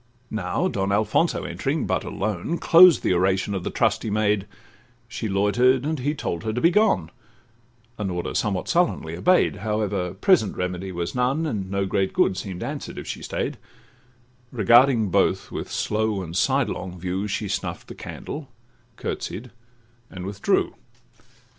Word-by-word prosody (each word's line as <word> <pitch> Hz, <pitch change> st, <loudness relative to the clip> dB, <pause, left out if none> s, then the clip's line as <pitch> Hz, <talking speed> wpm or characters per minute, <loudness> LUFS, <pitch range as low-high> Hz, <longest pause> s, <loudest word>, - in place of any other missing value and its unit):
Now, 90 Hz, -5 st, -1 dB
Don 100 Hz, 0 st, -1 dB
Alfonso 105 Hz, +2 st, +1 dB
entering, -, -, -2 dB
but -, -, 0 dB
alone, 105 Hz, -, -2 dB
Closed 170 Hz, 0 st, +7 dB
the -, -, +2 dB
oration 95 Hz, +2 st, +1 dB
of 95 Hz, -3 st, -3 dB
the -, -, -2 dB
trusty 110 Hz, -, 0 dB
maid: 105 Hz, -1 st, +1 dB, 0.6 s
She 115 Hz, -2 st, -4 dB
loiter'd, 120 Hz, +7 st, +3 dB
and 155 Hz, -1 st, -1 dB
he 145 Hz, +4 st, -1 dB
told 85 Hz, -, -3 dB
her 110 Hz, -, -1 dB
to 115 Hz, -, -2 dB
be 170 Hz, +6 st, +4 dB
gone, 175 Hz, -, +2 dB, 0.9 s
An 100 Hz, -2 st, -1 dB
order 90 Hz, -1 st, -3 dB
somewhat 100 Hz, -4 st, -1 dB
sullenly 170 Hz, -, +1 dB
obey'd; 180 Hz, -, +3 dB
However, 105 Hz, -4 st, -2 dB
present 180 Hz, -, +3 dB
remedy 90 Hz, +1 st, -3 dB
was 85 Hz, -1 st, -3 dB
none, 130 Hz, +6 st, +1 dB
And 105 Hz, -10 st, -3 dB
no 100 Hz, 0 st, 0 dB
great 95 Hz, 0 st, 0 dB
good -, -, +2 dB
seem'd 95 Hz, -1 st, -5 dB
answer'd -, -, -5 dB
if -, -, -6 dB
she -, -, -5 dB
stay'd: -, -, -3 dB, 0.9 s
Regarding 120 Hz, -1 st, +4 dB
both 95 Hz, 0 st, +1 dB
with -, -, -5 dB
slow 105 Hz, -2 st, -1 dB
and 85 Hz, -1 st, -7 dB
sidelong 90 Hz, 0 st, 0 dB
view, 95 Hz, +3 st, -2 dB
She 105 Hz, +1 st, -2 dB
snuff'd 100 Hz, -, -4 dB
the -, -, -8 dB
candle, 145 Hz, -2 st, -7 dB, 0.5 s
curtsied, 120 Hz, +2 st, -5 dB, 0.6 s
and 90 Hz, -1 st, -7 dB
withdrew. 100 Hz, +1 st, 0 dB
100 Hz, 155 wpm, -24 LUFS, 95-125 Hz, 0.9 s, Closed